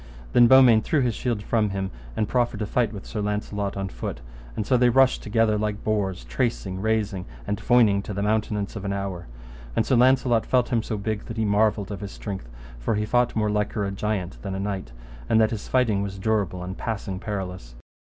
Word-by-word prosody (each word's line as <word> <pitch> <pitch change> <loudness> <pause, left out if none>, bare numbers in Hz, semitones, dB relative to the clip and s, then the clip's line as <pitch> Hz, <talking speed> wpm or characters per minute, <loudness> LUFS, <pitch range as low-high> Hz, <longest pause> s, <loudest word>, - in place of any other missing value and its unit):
And 120 -1 +7
then 130 0 +9
Beaumains 115 -3 +5
threw 155 - +1
his 120 -3 +1
shield 115 -2 -2
from 110 -1 +1
him, 95 -1 -3 0.3
and 105 - +1
proffered 120 -3 0
to - - 0
fight 115 +1 +1
with 100 -2 -8
Sir 110 - -4
Launcelot 105 -1 -2
on 95 0 -2
foot; - - -5 0.4
and 105 - -2
so 125 - +2
they 125 0 +5
rushed 130 +1 +4
together 110 0 +1
like 105 0 -2
boars, 100 - -1
tracing, - - -2
rasing, 105 -4 0 0.2
and 105 - -2
foining 115 -5 +4
to - - -5
the 100 - -1
mountenance 105 -1 -1
of 100 - -5
an 100 -1 -2
hour; 95 -3 -4 0.5
and 110 - +2
Sir 130 - +2
Launcelot 125 -2 +3
felt 125 -2 +2
him 120 -3 +1
so 110 -1 -4
big 105 +1 -3
that 115 - -7
he 110 - +1
marvelled 105 0 +2
of 100 -1 -5
his 100 -1 -6
strength, 95 - -6 0.3
for - - 0
he 105 +1 0
fought 120 +2 +1
more 105 -1 +1
liker 105 0 -1
a 100 - -2
giant 100 -2 -3
than 95 -1 -4
a - - -3
knight, 95 -10 -3 0.4
and 110 - +4
that 110 -1 +3
his 110 -3 -5
fighting 115 -6 +2
was 100 -1 -4
durable 95 -3 -1
and 95 +2 -6
passing 100 -4 -3
perilous. 90 - -5
105 Hz, 220 wpm, -25 LUFS, 100-115 Hz, 0.5 s, then